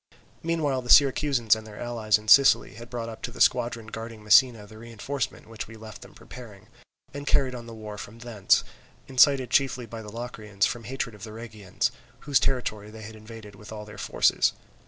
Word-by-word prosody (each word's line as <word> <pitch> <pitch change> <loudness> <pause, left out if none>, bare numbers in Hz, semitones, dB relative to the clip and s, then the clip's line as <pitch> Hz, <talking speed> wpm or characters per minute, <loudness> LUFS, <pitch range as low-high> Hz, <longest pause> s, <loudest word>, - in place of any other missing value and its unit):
Meanwhile 155 -6 -1
the 125 - -11
Syracusans 135 -5 +5
and 110 0 -9
their 105 -1 -11
allies 115 -3 +1
in 105 0 -15
Sicily 140 +3 +6
had 120 +1 -11
brought 120 -2 -5
up 110 -1 -9
to - - -4
the - - -12
squadron 115 -1 +2
guarding 115 0 -8
Messina 110 +1 +5
the 110 +1 -14
reinforcement 115 +3 -5
which 115 -1 -7
we 115 - -12
left 110 -1 -11
them - - -14
preparing, 110 -6 -13 0.4
and 145 +1 -7
carried 135 -3 +2
on 120 -1 -8
the 115 - -9
war 105 -2 -8
from 105 +3 -9
thence, 115 -4 +1 0.4
incited 130 0 +4
chiefly 130 -3 +1
by 115 0 -8
the 105 -1 -10
Locrians 110 -4 -2
from 115 -2 -4
hatred 130 -2 -4
of 105 -2 -13
the 110 -1 -8
Rhegians, 110 0 -3 0.3
whose 145 -2 +2
territory 110 -5 -2
they 110 0 -11
had 110 +2 -9
invaded 110 -1 -12
with 105 +2 -13
all 105 -1 -7
their 105 -1 -12
forces. - - +2
115 Hz, 200 wpm, -26 LUFS, 105-125 Hz, 0.4 s, Sicily